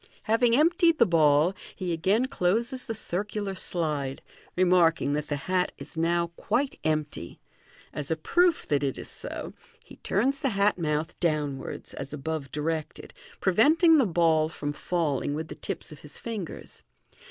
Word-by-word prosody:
Having 230 +1 +3
emptied 335 +3 +4
the 235 - +6
ball, 155 -1 +4 0.2
he 180 -2 -2
again 195 +9 +2
closes 235 +3 -1
the 225 - -2
circular 205 0 -3
slide, 150 -7 -2 0.3
remarking 175 -5 +3
that 150 0 -2
the 145 - -1
hat 180 +5 0
is - - -8
now 170 +1 +1
quite 270 +2 -1
empty. 155 - -2 0.5
As 145 -2 -5
a 160 - +1
proof 345 - +2
that 145 -1 +1
it 135 -2 -1
is - - -5
so, - - -6 0.3
he - - -15
turns 265 +8 0
the 280 -3 0
hat 200 -3 +2
mouth 155 +1 -2
downwards 150 -5 -2
as 140 +1 -7
above 150 -2 -4
directed, 155 +1 -3 0.3
preventing 310 - +5
the 255 - +3
ball 160 -3 +3
fiom 145 -2 -4
falling 145 -4 -1
with 160 +1 -4
the - - -5
tips - - -6
of 150 - -11
his 150 -2 -11
fingers. 215 -7 -6
170 Hz, 155 wpm, -27 LUFS, 150-220 Hz, 0.5 s, the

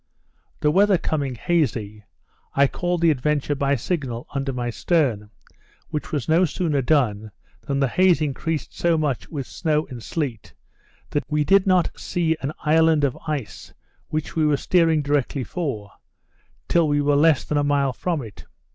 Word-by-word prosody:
The 150 - +3
weather 200 +2 +4
coming 140 -6 -2
hazy, 110 -9 -1 0.5
I 140 - +5
called 175 +4 -2
the 165 -1 +5
Adventure 145 +1 0
by 140 0 +1
signal 125 -4 -3
under 135 -1 -2
my 120 -2 -3
stern, 120 - 0 0.6
which 150 - -4
was 145 -6 -2
no 165 +3 +4
sooner 160 -4 0
done, 120 -7 +1 0.4
than 140 -1 0
the 135 - +2
haze 180 +2 +3
increased 155 +1 -3
so 170 -1 +2
much 145 -5 -2
with 140 -5 -4
snow 155 0 -1
and 120 -2 -7
sleet, 115 - -4 0.6
that 145 - -2
we 150 0 +1
did 195 +4 +4
not 185 -2 +3
see 165 -2 0
an 135 - -2
island 160 0 +3
of 135 -3 +1
ice, 140 -9 -5 0.3
which 155 0 -4
we 160 - +2
were 150 -2 +3
steering 165 -2 +2
directly 140 -1 0
for, 125 - -4 0.8
till 170 -2 +3
we 145 0 +1
were 145 0 +2
less 150 0 +4
than 150 - -1
a - - +1
mile 140 -2 +1
from 165 0 -2
it. 110 -3 -12
145 Hz, 165 wpm, -23 LUFS, 135-160 Hz, 0.8 s, I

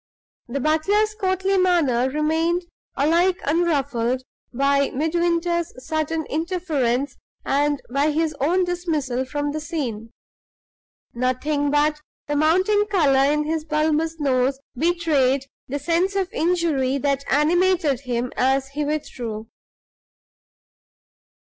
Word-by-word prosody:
The 260 +4 -3
butler's 390 +9 +1
courtly 380 -2 0
manner 295 -9 +2
remained 320 +4 0 0.3
alike 345 +6 +2
unruffled 275 -6 0 0.3
by 275 +2 +2
Midwinter's 340 +3 0
sudden 315 +1 -1
interference 300 -6 -1 0.3
and 290 +1 +1
by 280 +4 +1
his 310 +1 0
own 350 +7 +2
dismissal 310 -8 -2
from 290 +2 -2
the 310 - -3
scene. 250 -9 -4 1.0
Nothing 270 +4 0
but 300 +1 +1 0.2
the 295 - -2
mounting 375 +8 +3
color 285 -8 +3
in 300 0 +1
his 315 +1 -2
bulbous 315 +1 0
nose 265 -1 +1 0.2
betrayed 290 -4 +1 0.2
the 280 - -3
sense 345 +6 0
of 385 -2 -1
injury 315 -6 +1
that 280 0 0
animated 325 -1 +2
him 245 -2 -3
as 270 +1 +1
he 295 +2 -3
withdrew. 240 -7 -4
300 Hz, 110 wpm, -22 LUFS, 275-340 Hz, 1.0 s, mounting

